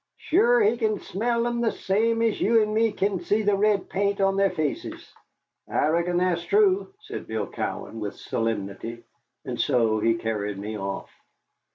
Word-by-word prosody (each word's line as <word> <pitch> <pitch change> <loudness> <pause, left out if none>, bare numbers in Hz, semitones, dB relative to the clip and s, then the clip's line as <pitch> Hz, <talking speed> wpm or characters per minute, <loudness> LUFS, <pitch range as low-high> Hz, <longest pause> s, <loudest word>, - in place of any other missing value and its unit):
Sure 455 +7 +3
he 240 - +3
can 220 -3 0
smell 235 +4 -1
thim 240 0 -1
the 230 - +2
same 225 +4 +1
as 225 -2 0
you 230 +2 +4
an' 215 -1 +1
me 225 0 +3
kin 200 -2 -1
see 205 +5 0
the 205 -1 +3
red 205 -1 +2
paint 200 +1 0
on 195 0 +2
their 195 0 +3
faces." 155 -5 -4 0.6
"I 150 - +1
reckon 170 +2 +1
that's 180 -1 +1
true," 400 - +3
said 425 0 -7
Bill 110 -2 -2
Cowan, 115 - -5
with 105 -2 -4
solemnity, 115 +1 -4 0.4
and - - -2
so 115 -3 +2
he 115 +1 +2
carried 105 -3 -3
me 105 +2 -5
off. 100 -1 -5
195 Hz, 175 wpm, -25 LUFS, -, 0.6 s, you